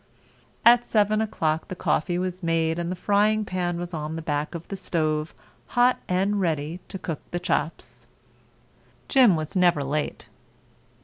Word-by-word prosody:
At 240 0 +7
7 215 0 +2
o'clock 160 -7 -1
the 185 - -6
coffee 175 0 0
was 185 0 -3
made 165 -1 0
and 170 +1 -2
the - - -2
frying 210 +3 +2
pan 180 -2 -2
was 175 0 -6
on 155 0 -4
the 165 - -5
back 150 +2 -2
of 170 - -7
the 195 - -3
stove 155 -4 -1 0.5
hot 245 +1 +4
and 195 +3 +1
ready 160 -1 -1
to - - -6
cook 165 -4 -5
the 175 - -3
chops. 170 -2 -3 1.0
Jim 250 - +5
was 155 +4 -4
never 175 -5 +3
late. 145 +2 -3
175 Hz, 160 wpm, -25 LUFS, 160-195 Hz, 1.0 s, At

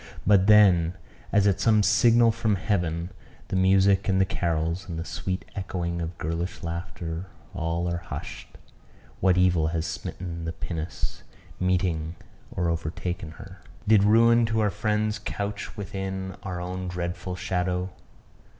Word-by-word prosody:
But 100 -1 +5
then, 95 -5 +6 0.4
as 105 -1 +4
at 100 -1 +3
some 110 -1 +4
signal 115 +1 +5
from 110 -2 0
heaven, 90 -3 -1 0.4
the - - -2
music 95 +1 +4
and 95 0 +3
the 95 - +4
carols, 85 0 -1
and 85 - -4
the 85 - -4
sweet 95 -1 -4
echoing 85 -3 -3
of 85 0 -5
girlish 85 +3 -3
laughter 85 +1 -5 0.3
all 85 +2 -1
are 85 0 -1
hushed. 85 - -8 0.6
What 95 -1 +3
evil 90 -3 +3
has 80 0 -1
smitten 85 0 -5
the 80 - -3
pinnace, 80 -2 -5 0.4
meeting 90 -3 0 0.3
or 90 - -1
overtaken 85 +1 -3
her? 95 +2 -12 0.3
Did 105 -2 +6
ruin 115 +2 +5
to 110 0 +1
our 105 -2 +2
friends 105 0 0
couch 100 +1 -4
within 95 -1 -4
our 90 -2 -4
own 90 +1 -4
dreadful 90 +1 -4
shadow? 90 0 -1
90 Hz, 140 wpm, -26 LUFS, 85-100 Hz, 0.6 s, then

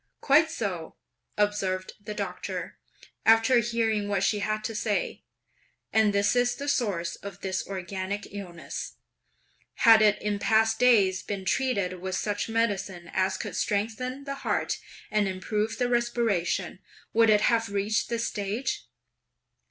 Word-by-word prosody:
"Quite 305 +3 +4
so!" 195 - -4 0.4
observed 195 -3 0
the 210 0 -6
Doctor, 195 -3 -5 0.4
after 225 +2 +5
hearing 225 -3 0
what 200 -2 0
she 210 - +2
had 215 +1 -1
to 225 - -3
say, 215 -1 -1 0.7
"and 220 -1 +4
this 200 +3 +2
is 245 0 +2
the 285 - -6
source 195 -11 0
of 200 -1 -9
this 190 -1 -2
organic 190 +1 -4
illness! 180 -4 -6 0.9
Had 225 -1 +9
it 210 -1 +4
in 205 -1 -2
past 220 +1 +3
days 200 -7 +4
been 195 -2 -5
treated 200 -8 0
with 185 0 -3
such 205 +1 -2
medicine 200 -6 -1
as 190 0 +1
could - - -5
strengthen 230 +6 -2
the 275 0 -5
heart, - - -1 0.3
and 210 -2 +2
improve 210 +3 -2
the 245 - +1
respiration, 230 -7 0 0.3
would 225 0 +5
it 210 -1 +5
have 230 -1 +2
reached 205 +2 0
this 230 -1 -1
stage? 205 +5 -3
210 Hz, 140 wpm, -27 LUFS, 195-230 Hz, 0.9 s, Had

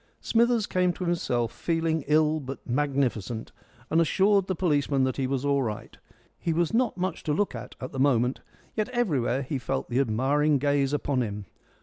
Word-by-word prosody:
Smithers 235 -1 +2
came 180 -2 +1
to 180 - -5
himself, 120 -9 0
feeling 165 -2 -1
ill 155 +1 +3
but 135 -1 -8
magnificent, 125 -5 -1 0.4
and 165 - +4
assured 195 +4 +3
the 185 - -1
policeman 145 -6 +1
that 130 0 0
he 135 -2 0
was 135 0 -2
all 140 -1 +2
right. 110 -4 -4 0.4
He 165 - -1
was 170 +4 0
not 235 -3 +1
much 185 +1 -2
to 150 - -1
look 205 +6 0
at 120 +1 -8
at 130 - -6
the 135 - -5
moment, 130 -2 +2 0.3
yet 215 +2 -1
everywhere 145 - 0
he 135 +1 -3
felt 65 - -3
the 125 - +2
admiring 140 +5 +2
gaze 140 0 +1
upon 145 -3 0
him. 105 -3 -4
145 Hz, 185 wpm, -27 LUFS, 130-170 Hz, 0.4 s, and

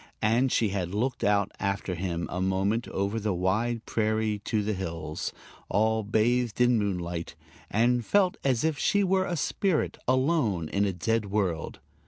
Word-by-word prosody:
And 120 +4 +3
she 110 - +2
had 95 -1 -3
looked 125 +3 -1
out 100 -1 +2
after 100 -1 -1
him 85 -1 -2
a 90 - -2
moment 95 +4 0
over 100 +3 -1
the 105 -3 -1
wide 110 +6 0
prairie 110 -1 0
to 110 -2 0
the 105 +1 -1
hills, 85 -5 -4 0.4
all 110 +2 +2
bathed 115 +2 +1
in 125 -1 +4
moonlight, 90 -4 -3 0.3
and 120 +3 +2
felt 190 - +3
as 130 -4 +1
if 160 -3 0
she 205 0 +2
were 190 0 +2
a 175 -2 -2
spirit 180 +3 0
alone 130 - +1
in 100 +1 +1
a 100 - +1
dead 110 +5 0
world. 95 -5 -1
110 Hz, 165 wpm, -28 LUFS, 95-120 Hz, 0.4 s, in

